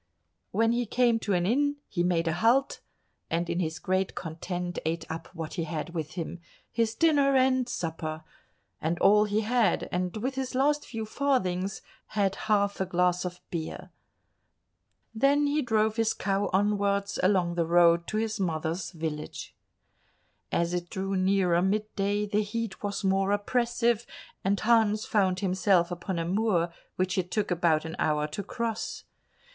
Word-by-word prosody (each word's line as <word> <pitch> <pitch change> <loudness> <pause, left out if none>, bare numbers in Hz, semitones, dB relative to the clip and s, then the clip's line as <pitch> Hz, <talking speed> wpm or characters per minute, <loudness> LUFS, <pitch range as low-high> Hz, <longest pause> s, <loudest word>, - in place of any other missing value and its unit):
When 225 +1 +2
he 240 0 0
came 240 0 +3
to 205 - -1
an 175 -1 +1
inn 285 +7 +2
he 175 - -2
made 170 -1 +1
a 165 - +1
halt, 235 +10 +2 0.5
and 170 +1 0
in 170 +1 -1
his 160 -2 -2
great 185 +3 -1
content 175 +2 -4
ate 165 +1 -2
up 165 0 -6
what 165 -2 -5
he 170 -3 -2
had 155 +1 -4
with 155 -3 -4
him—his 185 +6 -4
dinner 285 -3 +4
and 255 -1 +3
supper—and 160 0 -5
all 210 +3 +5
he 210 +1 0
had, 225 -3 +1
and 180 +3 -2
with 255 +5 -2
his 265 -1 -4
last 290 +3 +2
few 225 -2 -4
farthings 195 -7 -1 0.3
had 195 -2 +2 0.2
half 200 -2 +2
a - - +2
glass 180 0 +1
of 180 0 -6
beer. 165 -2 -5 1.2
Then 275 +6 +3
he 290 +1 +1
drove 220 -3 +1
his 225 -1 +1
cow 195 +1 0
onwards 200 0 +1
along 185 -2 +2
the 170 -1 0
road 170 0 +4
to 215 - -2
his 220 -1 -1
mother's 165 -1 -2
village. 155 -2 -5 1.0
As 170 +1 0
it 175 -1 -3
drew 195 +1 -2
nearer 185 -2 +3
mid 210 +3 -1
day, 205 +1 0
the 210 +1 +1
heat 215 -1 -4
was 205 0 -3
more 195 0 +2
oppressive, 235 +2 +1 0.4
and 195 +1 +1
Hans 220 -2 +3
found 185 -3 +1
himself 185 -2 +2
upon 175 +1 -3
a 165 - -1
moor 180 -3 +1 0.2
which 185 0 0
it 180 -1 -2
took 210 0 -1
about 165 -3 +2
an 160 - -5
hour 150 -1 +1
to 155 +7 -4
cross. 230 +1 -4
195 Hz, 160 wpm, -28 LUFS, 175-220 Hz, 1.2 s, all